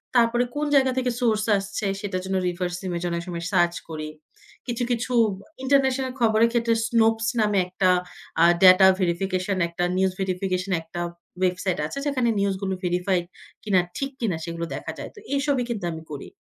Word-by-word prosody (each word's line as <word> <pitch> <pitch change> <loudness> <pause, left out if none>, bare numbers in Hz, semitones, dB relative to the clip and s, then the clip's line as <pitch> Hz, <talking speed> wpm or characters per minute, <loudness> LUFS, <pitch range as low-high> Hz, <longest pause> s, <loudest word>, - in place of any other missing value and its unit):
তারপরে 240 0 +4
কোন 295 +1 0
জায়গা 265 -1 +4
থেকে 250 -1 +1
সোর্স 215 -3 +2
আসছে, 195 +1 -4 0.2
সেটার 195 -3 -3
জন্য 190 0 -1
রিভার্স 175 0 -2
ইমেজ 175 -1 -3
অনেক 170 0 -2
সময় 170 -1 -4
সার্চ 175 -2 +3
করি। 155 -1 -5 0.6
কিছু, 240 0 -2
কিছু 245 +1 -1 0.3
বা 195 - -16 0.2
ইন্টারন্যাশনাল 265 -1 +2
খবরের 225 0 +4
ক্ষেত্রে 230 -1 +2
Snopes 225 -1 +2
নামে 210 -1 +2
একটা 185 +1 +1 0.5
আ - - +7 0.2
ডাটা 185 +1 +9
ভেরিফিকেশন 185 +2 0
একটা 170 +1 -3
নিউজ 190 0 +2
ভেরিফিকেশন 185 0 -2
একটা 165 +2 -7 0.4
ওয়েবসাইট 185 0 0
আছে, 275 - -5
যেখানে 255 -4 +1
নিউজগুলো 195 -1 -1
ভেরিফাই 180 +1 +1 0.4
কিনা, 200 -4 +3 0.2
ঠিক 275 0 -2
কিনা 190 -8 0
সেগুলো 170 0 -4
দেখা - - -5
যায়। - - -7
তো - - -11 0.2
এসবই 275 -2 +1
কিন্তু 210 -7 -3
আমি 160 -1 -7
করি। 140 - -7
195 Hz, 170 wpm, -24 LUFS, 180-235 Hz, 0.6 s, ডাটা